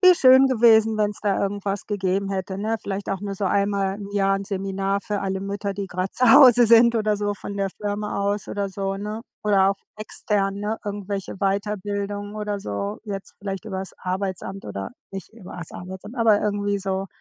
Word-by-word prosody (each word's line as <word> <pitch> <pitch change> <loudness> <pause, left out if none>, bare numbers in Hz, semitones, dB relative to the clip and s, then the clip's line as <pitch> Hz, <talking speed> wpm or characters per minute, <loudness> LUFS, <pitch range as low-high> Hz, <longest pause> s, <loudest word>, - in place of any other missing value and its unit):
wie 365 -1 +9
schön 260 -2 +7
gewesen, 225 -3 +5
wenn's 210 -1 0
da 200 -2 +1
irgendwas 200 0 -2
gegeben 195 -1 -1
hätte, 190 0 -3
ne? 220 +2 -1
Vielleicht 195 0 -4
auch 195 -1 -2
nur 200 -1 -4
so 195 - -3
einmal 200 0 +1
im 200 -1 -8
Jahr 195 -1 +2
'n 195 - -5
Seminar 195 0 -2
für 205 0 -3
alle 190 -1 -2
Mütter, 200 +1 -3
die 200 0 -4
grad 185 +1 -3
Zuhause 245 -1 +7
sind 235 +1 +6
oder 215 -2 +1
so 205 0 -1
von 200 0 -7
der 195 -1 0
Firma 205 0 -3
aus 200 0 -1
oder 200 -1 -2
so, 195 0 -3
ne? 210 +3 -5 0.2
Oder 195 -2 +4
auch 200 - -3 0.2
extern, 205 -2 -1
ne? 210 +2 -3
Irgendwelche 200 -1 -4
Weiterbildungen 205 +1 -2
oder 210 -1 -3
so, 200 - -4
jetzt 195 -3 -6
vielleicht 195 0 -5
übers 190 -3 -5
Arbeitsamt 190 +1 -4
oder 100 -1 -5 0.2
nicht 195 0 -8
übers 180 -6 -9
Arbeitsamt, 190 +5 -8
aber 225 -3 +4
irgendwie 205 -1 0
so. 195 0 -2
200 Hz, 185 wpm, -23 LUFS, 195-210 Hz, 0.2 s, wie